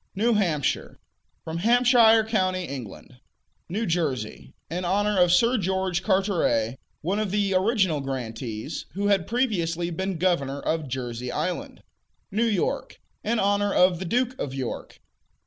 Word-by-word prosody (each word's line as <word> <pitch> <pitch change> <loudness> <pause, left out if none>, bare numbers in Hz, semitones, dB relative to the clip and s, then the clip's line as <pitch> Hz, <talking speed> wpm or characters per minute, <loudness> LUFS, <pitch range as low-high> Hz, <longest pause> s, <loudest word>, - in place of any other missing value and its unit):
New 230 +4 +2
Hampshire 170 -10 0 0.5
From 160 +1 -4
Hampshire 235 +1 +5
county, 185 -4 0
England. 125 - -8 0.5
New 215 +6 -1
Jersey 150 - -2 0.2
In 175 +3 -4
honor 205 +2 +1
of 180 -1 +5
Sir 235 +6 +4
George 190 -1 0
Carteret, 175 - +1 0.2
one 190 +6 -1
of 215 -2 -1
the 200 0 +1
original 190 - +2
grantees, 125 -2 -5
who 200 +3 0
had 195 -5 +2
previously 175 -9 0
been 190 +2 -2
governor 140 -6 0
of 160 0 -2
Jersey 125 -1 -4
Island. 180 - -3 0.5
New 225 +4 +1
York 205 -5 -1 0.2
In 235 +2 0
honor 205 0 +2
of 180 -2 +4
the 190 - -4
Duke 245 +7 +1
of 135 -1 -3
York. 130 -3 -5
185 Hz, 140 wpm, -25 LUFS, 150-205 Hz, 0.5 s, Hampshire